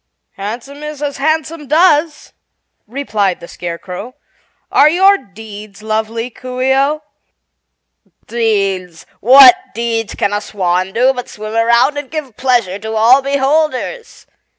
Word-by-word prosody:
"Handsome 235 +8 -7
is 300 -1 -7
as 285 -1 -3
handsome 315 +1 -2
does," 310 0 +2 0.5
replied 215 -7 -2
the 170 - -11
Scarecrow. 180 +9 -7 0.6
"Are 295 - +5
your 380 +5 +5
deeds 210 0 -12
lovely, 220 +2 -3
Coo 250 +1 -8
ce 260 +1 +2
oh?" 290 +3 0 1.2
"Deeds? 195 -7 -2
What 270 - +9 0.2
deeds 230 -1 -2
can 205 - -1
a 205 - -1
swan 185 -2 -1
do 255 +3 +3
but 250 -1 -7
swim 215 +1 -8
around 235 +5 +2
and 280 -3 -9
give 295 -8 -6
pleasure 235 -7 0
to 220 +2 -5
all 235 +5 +5
beholders?" 280 - -1
240 Hz, 130 wpm, -15 LUFS, 210-285 Hz, 1.2 s, What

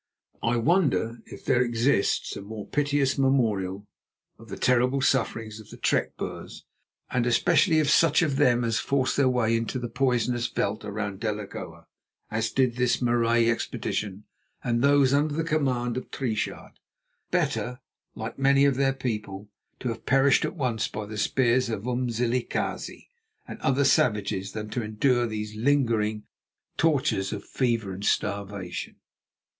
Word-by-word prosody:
I 115 +1 +1
wonder 135 -5 +1
if - - -11
there 120 - +3
exists 120 -1 +1
a - - -6
more 105 +1 -7
piteous 145 -2 0
memorial 105 -8 +1 0.5
of 115 0 -14
the 95 - -6
terrible 125 +2 +2
sufferings 115 -4 0
of 110 - -13
the - - -11
trek - - 0
Boers, - - -7 0.5
and 125 -2 +1
especially 160 - +3
of 155 - +1
such 160 +2 +4
of 140 -4 0
them 125 -4 +3
as 115 -1 0
forced 135 -2 0
their 135 -2 +3
way 115 -3 +2
into 115 +2 -2
the 120 -1 -4
poisonous 125 -1 0
veld 110 -2 -2
around 105 -1 -4
Delagoa, 105 -2 -5 0.5
as 110 +1 0
did 125 0 +1
this 125 -1 +2
Marais 120 -1 +2
expedition 105 -3 -2 0.4
and 120 -1 0
those 140 -1 +4
under 145 +1 +2
the 165 - 0
command 130 -7 0
of 130 - -6
Triechard. 115 -6 -4 0.5
Better, 125 +1 -1 0.4
like 115 +3 -6
many 140 +1 +4
of 140 -2 +2
their 135 -1 +2
people, 105 -6 -5 0.3
to 125 - -2
have 115 -1 -6
perished 135 +1 +4
at - - -4
once 125 -8 -1
by 110 -1 -6
the 110 +1 -8
spears 125 +3 +2
of 110 -3 -3
Umzilikazi 125 -1 -2 0.4
and - - -8
other 135 +1 +2
savages 105 -6 +1
than 110 -1 -5
to 125 - -2
endure 120 +3 +1
these 105 -1 -5
lingering 110 -4 +1 0.5
tortures 135 -11 +1
of 105 - -5
fever 115 -6 -1
and 95 +2 -7
starvation. 100 -3 -2
120 Hz, 150 wpm, -26 LUFS, 110-135 Hz, 0.5 s, such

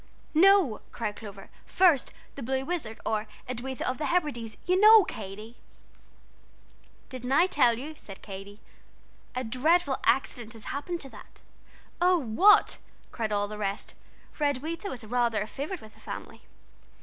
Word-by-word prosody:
"No," 360 - +5
cried 210 -3 -4
Clover; 200 -3 -11 0.2
"first 340 -8 +3 0.2
'The 280 - -8
Blue 265 +2 -2
Wizard, 285 -10 -3
or 215 0 -1 0.2
Edwitha 255 +1 -4
of 255 +1 -2
the 300 - -1
Hebrides,' 270 -11 -1
you 365 +1 +2
know, 430 0 +9
Katy." 215 - -8 1.5
"Didn't 255 -1 -6
I 305 +6 +5
tell 250 -10 +3
you?" 290 +6 -6
said 195 -9 -11
Katy; 200 +1 -9 0.7
"a 255 - -1
dreadful 275 +5 +2
accident 240 -4 0
has 225 -2 -12
happened 335 +5 -4
to 270 - -7
that." - - -15 0.6
"Oh, 360 0 +5
what?" 330 - +4 0.3
cried 220 -3 -3
all 205 0 0
the 210 0 -8
rest, 200 -1 -3 0.4
for 300 - -6
Edwitha 310 +8 -2
was 245 -8 -6
rather 235 -1 +1
a 205 - -2
favorite 290 - -5
with 215 0 -14
the - - -21
family. - - -8
255 Hz, 150 wpm, -28 LUFS, 220-315 Hz, 1.5 s, know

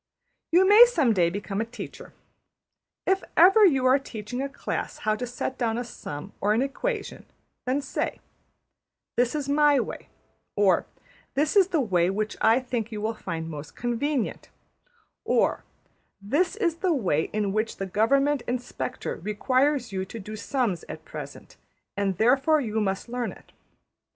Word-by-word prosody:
You 365 +3 +5
may 425 +4 +10
some 310 - +2
day 175 -4 +3
become 195 +2 -3
a - - +1
teacher. 230 +1 -9 0.9
If 385 0 +2
ever 385 +6 +7
you 270 -9 +4
are 260 +2 +5
teaching 240 -1 -6
a 275 - -2
class - - -4
how 215 0 +2
to 245 +3 -4
set 245 +2 -4
down 230 -2 0
a 245 - -2
sum 190 -6 -8
or 205 +2 +3
an 240 - +2
equation, 415 - -4 0.5
say - - -3 1.0
``This 245 +3 +1
is 290 -2 -2
my 290 0 +4
way,'' - - -5 0.5
or 195 -4 +3 0.5
``This 295 +5 +1
is 390 -3 +6
the 340 -5 0
way 180 -7 +2
which 210 +2 -2
I 225 +3 +5
think 245 -3 -3
you 215 - -4
will 220 +2 -1
find 165 -6 -5
most 150 -2 -8
convenient,'' 240 +2 -2 0.7
or - - +1 0.6
``This 345 - +1
is 340 -7 0
the 355 -2 +1
way 175 - +1
in 205 -2 -1
which 215 +1 -1
the 195 - -3
Government 275 +8 +2
Inspector 250 +1 -4
requires 255 - 0
you 190 -1 -2
to 225 +4 -8
do 210 +1 -9
the 215 - -5
sums 230 -5 -1
at - - -8
present, - - -9 0.4
and 195 -3 -1
therefore 270 - +4
you 220 -5 -1
must 195 +1 -2
learn 245 0 -3
it.'' - - -16
240 Hz, 160 wpm, -26 LUFS, 210-285 Hz, 1.0 s, may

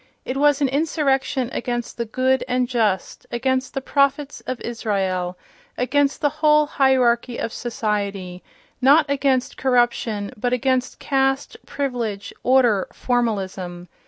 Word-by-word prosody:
It 255 - -3
was 290 +1 +3
an - - +4
insurrection 270 -3 0
against 240 -2 -3
the 235 - -2
"good 260 +3 +1
and 250 0 +1
just," 220 -7 -1
against 260 +2 -1
the 270 - -1
"prophets 280 +1 0
of 255 -2 -3
Israel," 190 -6 -2 0.4
against 280 +3 +1
the 290 - +3
whole 300 -1 +5
hierarchy 255 -4 +2
of 230 - -3
society—not 210 - 0
against 275 -2 0
corruption, 240 -4 +1
but 245 +2 -1
against 255 0 0
caste, 270 0 0
privilege, 235 -8 -3
order, 245 -6 +3
formalism. 190 -7 -2
250 Hz, 120 wpm, -22 LUFS, 220-270 Hz, 0.4 s, whole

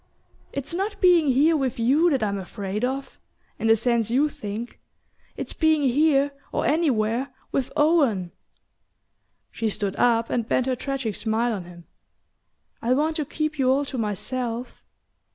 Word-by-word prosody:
It's 280 +3 -4
not 395 +4 -2
being 350 -5 +5
here 285 +5 +4
with 265 -5 -1
you 275 +9 +3
that 270 -7 +1
I'm 200 -1 -1
afraid 195 +3 -5
of 265 +2 -3 0.4
in 225 - 0
the 225 - +6
sense 230 -1 +1
you 275 +6 +2
think. 215 -1 -7 0.6
It's - - -5
being 315 -2 +2
here, 280 +1 +3 0.2
or - - -1
anywhere, 260 -5 +1 0.2
with 260 -2 -1
Owen." 275 - +2 1.2
She 225 - -2
stood 205 -1 -3
up 230 -1 +2
and 235 -2 -1
bent 255 - +2
her 260 -1 0
tragic 265 -4 -3
smile 225 +3 0
on 190 -4 -5
him. 175 -1 -13 1.0
"I 245 +2 +2
want 310 +3 +1
to 305 - -1
keep 310 +1 -3
you 260 -1 +3
all 275 +2 +2
to 270 - -5
myself." 230 +3 -3
255 Hz, 155 wpm, -24 LUFS, 225-290 Hz, 1.2 s, the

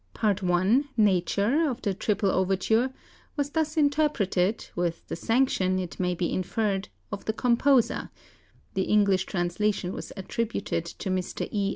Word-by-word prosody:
Part 205 -2 +1
I 185 +7 +3 0.2
"Nature" 210 - +2
of 250 - -5
the 200 - +1
"Triple 200 0 0
Overture" 195 +7 +1 0.4
was 285 -1 -1
thus 315 0 -1
interpreted, 280 -10 +1
with 175 -1 -2
the - - -2
sanction, 195 -3 +1
it 180 -2 -5
may 180 -1 0
be 175 0 -1
inferred, 195 +1 -1 0.2
of 205 - -6
the 220 - 0
composer 245 +1 +2 0.6
(the 190 -2 0
English 200 -3 +3
translation 180 +1 -1
was - - -7
attributed 205 -3 -2
to 185 +2 -5
Mr. 185 -1 -2
E. 200 -2 0
200 Hz, 145 wpm, -27 LUFS, 185-235 Hz, 0.6 s, I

